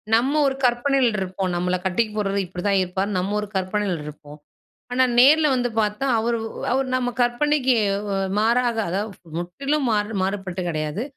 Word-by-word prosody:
நம்ம 255 +5 +2
ஒரு 265 - -1
கற்பனைல 250 +1 +2
இருப்போம். 190 0 -3
"நம்மள 180 +1 0
கட்டிக்க 200 +4 +1
போறவரு 200 -1 0
இப்படிதான் 190 +2 0
இருப்பார்னு", 190 +3 -2
நம்ம 190 +3 -2
ஒரு 210 - -4
கற்பனையில 190 -3 -1
இருப்போம். 150 0 -11 0.6
ஆனா 260 +1 +4 0.2
நேர்ல 300 +4 +6
வந்து 245 -1 0
பாத்தா, 210 +3 0
அவரு 230 +1 0
ஒ - - -4 0.2
அவரு 265 +1 +1
நம்ம 255 -1 0
கற்பனைக்கு 260 +2 +2 0.2
ஓ 205 - -6
வ 200 - -1 0.2
மாறாக, 235 +2 +2
அதாவது 195 -2 -5
முற்றிலும் 275 - -2
மாறு 210 0 0
மாறுபட்டு 190 -1 -3
கிடையாது. 155 +4 -3
210 Hz, 160 wpm, -23 LUFS, 185-245 Hz, 0.6 s, நேர்ல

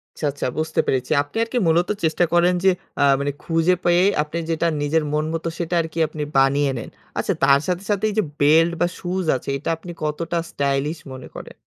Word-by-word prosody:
আচ্ছা, - - -4
আচ্ছা, 140 - -3
বুঝতে 160 - -1
পেরেছি। 130 +1 0
আপনি 145 +9 -9
আর 230 - -4
কি 250 - +1
মূলত 170 +2 +2
চেষ্টা 160 +2 +2
করেন 175 +1 +4
যে, 190 - +6 0.3
আ - - +5 0.2
মানে 145 0 -1
খুঁজে 165 +2 +2
পেয়ে 175 +1 +4 0.2
আপনি 155 +2 -6
যেটা 165 +1 +1
নিজের 155 +2 +1
মন 150 0 +1
মতো, 165 0 -3
সেটা 175 0 -2
আর 160 - -4
কি 165 - -3
আপনি 155 -1 -5
বানিয়ে 135 +1 +3
নেন। 115 - -6 0.3
আচ্ছা - - 0
তার 140 0 +6
সাথে, 180 +1 -1
সাথে 205 0 0
এই - - -4
যে, 215 - +3 0.2
বেল্ট 160 +4 +5
বা 175 - +4
শুজ 185 +1 -2
আছে, - - -7
এইটা 140 - -4
আপনি 175 +2 -9
কতটা 165 +3 -2
স্টাইলিশ 140 +3 -1 0.2
মনে 130 -1 -9
করেন? - - -9
160 Hz, 215 wpm, -22 LUFS, 145-175 Hz, 0.3 s, যে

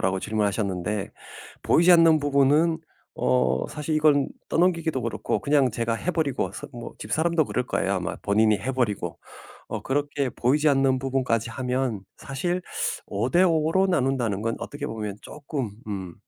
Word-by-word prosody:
라고 95 0 +1
질문 105 +1 0
하셨는데 100 0 -2 0.5
보이지 175 +2 +5
않는 165 -2 +6
부분은 145 +4 +3 0.4
어 65 0 +1
사실 150 +1 -3
이건 150 -2 +3 0.2
떠넘기기도 165 -5 +1
그렇고 115 - -2
그냥 140 -3 +3
제가 115 +1 -1
해버리고 155 -2 -1
선 - - -8
뭐 120 -1 -8
집사람도 160 +8 +1
그럴 125 +3 -2
거예요, 95 +1 0
아마. 90 -1 -3
본인이 105 0 +3
해 130 +6 -3
버리고. 120 -6 -2 0.5
어 - - -4
그렇게 140 -1 -1
보이지 145 +7 +2
않는 135 -1 +3
부분까지 125 -4 -1
하면 125 -2 -2 0.2
사실 175 +7 -3 0.4
5:5 160 - +2
로 190 +1 +3
나눈다는 130 - 0
건 115 0 -1
어떻게 145 0 -6
보면 105 -3 -5
조금 140 -6 -5 0.2
음 95 -4 -5
130 Hz, 325 characters per minute, -25 LUFS, 110-150 Hz, 0.5 s, 않는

